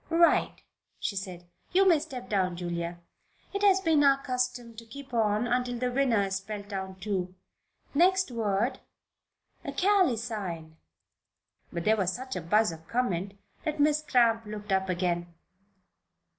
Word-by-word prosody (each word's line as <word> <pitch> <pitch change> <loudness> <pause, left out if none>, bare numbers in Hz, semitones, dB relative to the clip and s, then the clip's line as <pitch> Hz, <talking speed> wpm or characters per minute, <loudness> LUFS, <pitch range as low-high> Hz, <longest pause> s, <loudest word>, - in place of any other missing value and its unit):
"Right," 335 0 +3 0.4
she 200 - -2
said. 185 -3 -6 0.3
"You 385 +1 +5
may 335 -4 +6
step 260 -5 -7
down, 185 -3 0
Julia. 170 -1 -3 0.6
It 400 - -2
has 390 -2 +5
been 320 -5 +3
our 275 -1 +6
custom 250 -3 -3
to 230 - -9
keep 275 +1 -11
on 215 0 +2
until 245 0 0
the 250 +1 -1
winner 245 -5 +2
is 195 -1 -1
spelled 200 +1 -7
down, 190 -2 -5
too. 185 -2 -3 0.6
Next 365 +1 +3
word, 230 +2 0 0.8
Ruth: - - -6
'acalycine.'" 225 - 0 0.9
But 170 -1 -4
there 220 +1 +4
was 190 -2 +1
such 260 +4 -6
a 180 - -3
buzz 210 +4 +3
of 160 0 -11
comment 200 -5 -1 0.3
that 310 -2 -2
Miss 300 +1 +3
Cramp 235 -6 +3
looked 210 -1 -7
up 190 0 +1
again. 175 -1 -1
225 Hz, 150 wpm, -28 LUFS, 190-270 Hz, 0.9 s, may